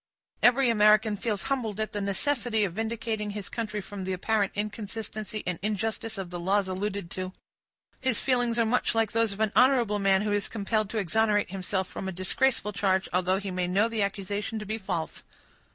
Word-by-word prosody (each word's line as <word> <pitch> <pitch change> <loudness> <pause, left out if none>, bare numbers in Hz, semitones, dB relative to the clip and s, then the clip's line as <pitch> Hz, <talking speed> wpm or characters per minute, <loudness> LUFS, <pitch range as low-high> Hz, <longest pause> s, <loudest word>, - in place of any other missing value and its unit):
Every 245 0 +5
American 215 0 +5
feels 210 -1 -2
humbled 235 -7 -2
at 215 - -1
the 205 - -3
necessity 225 +2 +1
of 190 -4 -1
vindicating 220 0 -2
his 205 -1 -5
country 215 -3 -3
from 200 0 -7
the 190 0 -2
apparent 200 +2 +1
inconsistency 215 0 -4
and 180 -2 -2
injustice 220 +1 -2
of 185 -2 -5
the 175 - -4
laws 195 +3 +1
alluded 190 -1 -3
to. 185 0 -4 0.7
His 260 -4 +1
feelings 245 -3 +2
are 230 - +3
much 230 +1 +1
like 225 -2 +2
those 230 -1 +2
of 200 - -7
an 215 -2 +2
honorable 245 -5 +4
man 195 0 +3
who 210 - -1
is 205 -1 0
compelled 215 -1 -1
to 225 - -4
exonerate 210 +1 +1
himself 190 0 -2
from 190 - -6
a - - -2
disgraceful 210 +4 0
charge, 190 0 +1
although 185 +1 +2
he 195 -1 -4
may 180 -1 -1
know 195 +5 +3
the 225 -2 -2
accusation 200 +2 -2
to 210 - -5
be 220 +2 -3
false. 170 -5 -4
210 Hz, 195 wpm, -28 LUFS, 195-225 Hz, 0.7 s, Every